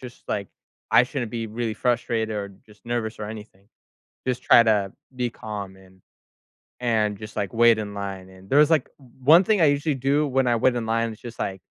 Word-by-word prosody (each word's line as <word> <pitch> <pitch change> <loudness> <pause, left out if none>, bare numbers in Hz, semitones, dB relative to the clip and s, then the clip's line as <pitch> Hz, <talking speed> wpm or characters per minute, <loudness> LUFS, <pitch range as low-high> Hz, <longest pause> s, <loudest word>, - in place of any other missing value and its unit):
just, 125 -1 -12
like, 100 -2 -2 0.4
I - - +7
shouldn't 125 -3 -4
be 115 -1 -4
really 110 0 -3
frustrated 115 -3 -1
or 100 -1 -3 0.2
just 105 +1 -20
nervous 120 -2 -3
or 105 - -5
anything. 105 -2 -10 0.6
Just 125 -1 -1
try 120 - +7
to 105 -4 +1 0.2
be 125 -1 0
calm 100 -4 -7
and 95 0 -20 0.8
and 110 -4 0
just, 105 +1 -10
like, 100 -3 -3
wait 115 -1 +5
in 105 -1 -5
line, 95 -2 -6
and 95 +1 -16
there 140 - +4
was, 150 - +6
like 160 - +2
o - - -17 0.2
one 165 +7 +7
thing 205 -2 +2
I - - +6
usually 145 0 +1
do 140 +3 +1
when 135 -1 +1
I 120 - +3
wait 125 +2 +2
in 120 -2 -2
line 115 0 0
is 110 - -15
just, 120 -1 -10
like 95 -2 -3
115 Hz, 215 wpm, -24 LUFS, 105-125 Hz, 0.8 s, I